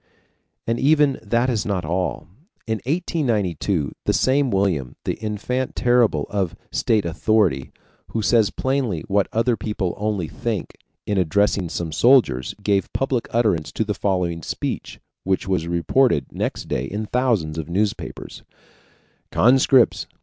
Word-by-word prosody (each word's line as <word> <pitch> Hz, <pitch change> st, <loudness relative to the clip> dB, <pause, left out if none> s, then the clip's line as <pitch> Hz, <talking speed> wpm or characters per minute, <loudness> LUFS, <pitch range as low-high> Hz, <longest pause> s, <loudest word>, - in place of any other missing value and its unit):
And 115 Hz, +1 st, -1 dB
even 145 Hz, -1 st, +3 dB
that 115 Hz, +3 st, +1 dB
is 115 Hz, -5 st, 0 dB
not 95 Hz, -5 st, -2 dB
all. 90 Hz, +3 st, -1 dB, 0.4 s
In 110 Hz, -3 st, -2 dB
1892, 105 Hz, -, 0 dB
the -, -, +2 dB
same 135 Hz, +1 st, +2 dB
William, 95 Hz, -, 0 dB
the -, -, -3 dB
ENFANT 115 Hz, +5 st, -2 dB
TERRIBLE 120 Hz, -2 st, +2 dB
of 95 Hz, -5 st, -1 dB, 0.2 s
state 110 Hz, -4 st, +1 dB
authority, 85 Hz, -5 st, +1 dB, 0.4 s
who 110 Hz, -, -3 dB
says 110 Hz, -2 st, +4 dB
plainly 130 Hz, -, -1 dB
what 100 Hz, 0 st, +2 dB
other 115 Hz, +2 st, +1 dB
people 100 Hz, -3 st, -3 dB
only 105 Hz, -5 st, -1 dB
think, 110 Hz, +1 st, -4 dB, 0.3 s
in 100 Hz, -2 st, 0 dB
addressing 95 Hz, +1 st, +1 dB
some 85 Hz, 0 st, -4 dB
soldiers 110 Hz, -, +3 dB
gave 100 Hz, -1 st, +1 dB
public 135 Hz, -3 st, -1 dB
utterance 105 Hz, -10 st, +1 dB
to -, -, 0 dB
the 105 Hz, -1 st, -2 dB
following 90 Hz, -5 st, -1 dB
speech, -, -, -4 dB, 0.2 s
which 95 Hz, 0 st, -1 dB
was 90 Hz, -4 st, 0 dB
reported 85 Hz, -, +2 dB
next -, -, -3 dB
day 60 Hz, -, -1 dB
in 105 Hz, +9 st, -4 dB
thousands 105 Hz, -11 st, 0 dB
of 80 Hz, 0 st, -6 dB
newspapers: 100 Hz, +4 st, -3 dB, 0.9 s
"Conscripts!" 130 Hz, +1 st, +4 dB
105 Hz, 135 wpm, -22 LUFS, 90-120 Hz, 0.9 s, says